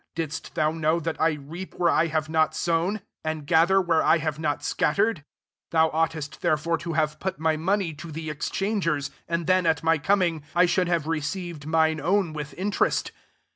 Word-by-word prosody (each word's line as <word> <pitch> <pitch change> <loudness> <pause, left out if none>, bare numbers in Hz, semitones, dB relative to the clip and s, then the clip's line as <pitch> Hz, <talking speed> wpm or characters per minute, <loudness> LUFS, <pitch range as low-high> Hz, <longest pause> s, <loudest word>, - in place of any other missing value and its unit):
Didst 160 -2 -5
mou 155 0 +2
know 160 +1 +1
that 165 0 -4
I 160 0 +3
reap 155 +6 -8
where 175 -1 +2
I 165 - +3
have 155 -1 -1
not 160 0 +1
sown, 175 +5 0 0.2
and 155 -2 -3
gather 170 +5 +4
where 170 -4 +2
I 165 - +4
hare 155 -1 -1
MATTHEW - - -12
XXVI. 150 - -15
not 145 -2 0
Bcattered? 200 +10 +1
£r - - -22 0.5
Thou 160 -1 +3
ovght 165 +1 +1
est 155 0 -7
therefore 155 +2 +1
to 170 -1 -4
have 155 -1 0
put 190 - -3
my 160 0 +2
money 180 +1 0
to 160 +3 -9
the 160 0 -5
exchangers; 165 -3 -1 0.2
and 170 0 -1
iJken, 185 0 +3
at 160 -1 +1
my 165 -1 +3
coming, 175 -2 +1
I 180 +1 +6
should 180 0 +1
have 170 -3 0
received 165 0 -3
mine 160 -1 +2
own 185 -3 +1
with 150 -1 -6
Interest. 200 +3 0
160 Hz, 205 wpm, -25 LUFS, 155-175 Hz, 0.5 s, I